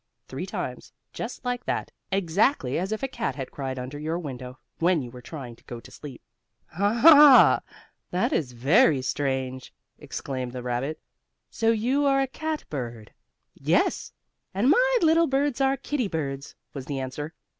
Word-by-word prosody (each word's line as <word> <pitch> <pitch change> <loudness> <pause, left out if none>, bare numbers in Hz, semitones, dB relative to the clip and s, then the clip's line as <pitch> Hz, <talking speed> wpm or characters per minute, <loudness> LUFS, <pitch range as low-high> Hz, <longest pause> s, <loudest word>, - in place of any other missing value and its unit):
three - - -6
times, - - -6 0.2
just - - -6
like 245 0 -2
that, - - -3 0.2
exactly 190 - +1
as 190 +3 -3
if 220 +4 -3
a - - +1
cat 135 - -3
had 130 -3 -6
cried 135 -2 -5
under 130 +3 -6
your 160 +3 -2
window, 130 -6 -7 0.2
when 170 0 +3
you 120 - -8
were 125 0 -11
trying 125 -4 -8
to - - -26
go 120 - -7
to - - -15
sleep. 140 -5 -11 0.5
"Ha! 255 - +7 0.5
That 180 +1 0
is 130 -6 -1
very 135 - +3
strange!" 130 -2 -2 0.3
exclaimed 130 -2 -5
the 125 -1 -6
rabbit. 125 +5 -3 0.5
"So 225 - +1
you 250 +6 +2
are 275 0 +3
a 270 - +2
cat 310 +3 -4
bird." 120 -6 -6 0.4
"Yes, - - 0 0.4
and 235 +8 +3
my - - +4
little 330 +1 +4
birds 275 0 0
are 270 0 +2
kittie 275 -6 -2
birds," 140 -5 -4 0.2
was 135 -2 -7
the 140 -2 -3
answer. 145 +5 -6
155 Hz, 165 wpm, -26 LUFS, -, 0.5 s, Ha